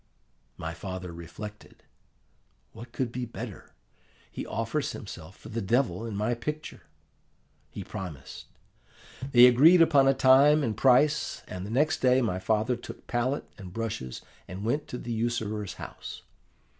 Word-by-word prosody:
"My 80 +1 -5
father 90 0 -6
reflected, 85 +6 -10 0.9
'What 115 +2 -11
could 125 -2 -2
be 125 0 -4
better! 115 - -9 0.6
he - - -6
offers 115 +7 -2
himself 95 -4 -9
for - - -12
the 115 +1 -3
Devil 115 0 0
in 110 - -5
my 105 +4 0
picture.' 150 +6 -5 0.9
He - - -7
promised. 80 -8 -8 0.8
They 120 -1 +9
agreed 145 +9 +7
upon 145 -5 +5
a 135 - +4
time 140 +4 +6
and 110 -4 -1
price; 140 +6 +3
and 90 +1 -6
the - - -7
next 150 +7 +1
day 130 0 +4
my 110 -7 0
father 110 +5 +1
took 120 - -10
palette 125 +4 -1
and 95 -2 -9
brushes 100 - -5 0.2
and 95 +3 -6
went 145 +6 -1
to 125 - -5
the 120 - -6
usurer's 110 -3 -2
house. - - -9
115 Hz, 145 wpm, -28 LUFS, 100-130 Hz, 0.9 s, They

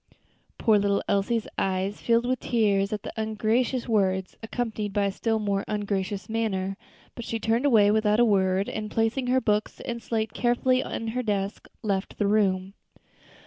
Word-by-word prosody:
Poor 220 -3 +4
little 200 0 +1
Elsie's 205 +3 +1
eyes 190 +1 -1
filled 235 0 +2
with 255 0 0
tears 205 -4 +1
at 210 -1 -3
these - - -5
ungracious 220 +4 0
words, 190 -4 +1
accompanied 220 -3 -3
by 205 -1 +2
a 200 - 0
still 225 +3 0
more 200 -2 -1
ungracious 205 -1 -2
manner; 195 -4 -1 0.4
but 235 - -7
she 225 0 -3
turned 230 +5 +1
away 210 -6 +5
without 215 0 +2
a 240 - +6
word, 190 -2 +2
and 215 -1 -4
placing 225 +4 0
her 255 +1 +3
books 215 -3 -1
and 235 -1 -4
slate 220 -3 -2
carefully 250 +2 +2
in 225 -3 -4
her 250 +3 -1
desk, 200 -3 -2 0.2
left 195 -2 -2
the 205 - +1
room. 195 -2 +1
215 Hz, 170 wpm, -26 LUFS, 200-230 Hz, 0.4 s, a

